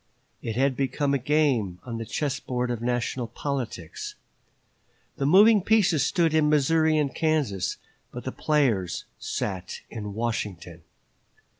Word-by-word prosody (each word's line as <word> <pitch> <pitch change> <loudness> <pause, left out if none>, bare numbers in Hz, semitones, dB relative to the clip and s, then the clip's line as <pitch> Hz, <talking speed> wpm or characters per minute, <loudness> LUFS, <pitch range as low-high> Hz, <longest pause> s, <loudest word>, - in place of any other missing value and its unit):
It 115 - -4
had 135 +1 +2
become 140 +2 0
a 140 - +2
game 130 - +1
on 115 -2 -5
the 115 - -5
chess 140 -3 -2
board 125 -1 -2
of 120 -2 -3
national 120 0 -1
politics. 120 - -5 1.0
The 135 - 0
moving 205 +6 +7
pieces 190 -8 +3
stood 165 +2 +2
in 155 -1 +3
Missouri 155 +2 +3
and 145 -3 0
Kansas, 150 - 0 0.3
but - - -7
the - - -3
players 120 - 0
sat 95 -3 -4
in 105 -3 -6
Washington. 100 -7 -3
130 Hz, 135 wpm, -26 LUFS, 115-150 Hz, 1.0 s, moving